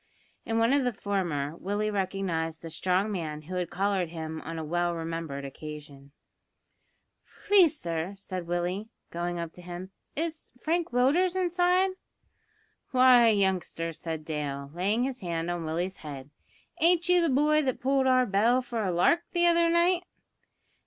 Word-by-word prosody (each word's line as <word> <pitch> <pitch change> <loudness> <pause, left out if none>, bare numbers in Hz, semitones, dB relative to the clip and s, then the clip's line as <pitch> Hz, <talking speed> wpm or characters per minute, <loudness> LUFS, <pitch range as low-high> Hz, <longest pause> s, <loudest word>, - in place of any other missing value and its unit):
In 225 -1 0
one 230 +3 +3
of 280 -1 +3
the 250 - +1
former 165 -8 -1
Willie 205 +3 -1
recognised 185 -5 -2
the 165 - -6
strong 185 +5 +1
man 155 -5 -4
who 175 +5 -8
had 180 -2 -2
collared 195 -2 0
him 160 -1 -6
on 165 0 -6
a 160 - -3
well 175 +2 0
remembered 165 -4 -4
occasion. 145 -1 -9 1.3
"Please, 365 -7 +5
sir," 170 +3 -3
said 185 -3 -6
Willie, 175 +5 -2 0.2
going 175 +1 -3
up 170 -1 -5
to 180 - -13
him, 180 +2 -8 0.2
"is 320 +1 -4
Frank 335 +3 0
Willders 295 +10 +2
inside?" 360 +1 +2 1.0
"Why, 255 -2 +6
youngster," 190 -5 +1
said 160 -1 -6
Dale, 140 -3 -4
laying 200 +7 +1
his 260 -1 -3
hand 170 -2 -2
on 175 -2 -3
Willie's 175 +4 -2
head, 145 -2 -9 0.5
"ain't 340 +1 +3
you 360 -1 +5
the 335 - +2
boy 300 +3 +3
that 260 -4 -1
pulled 270 0 +2
our 255 -1 +4
bell 230 +5 +2
for 235 -2 -3
a 190 - 0
lark 180 - +3
the 345 -1 +3
other 340 -1 +4
night?" 340 +1 +3
190 Hz, 160 wpm, -28 LUFS, 165-260 Hz, 1.3 s, Why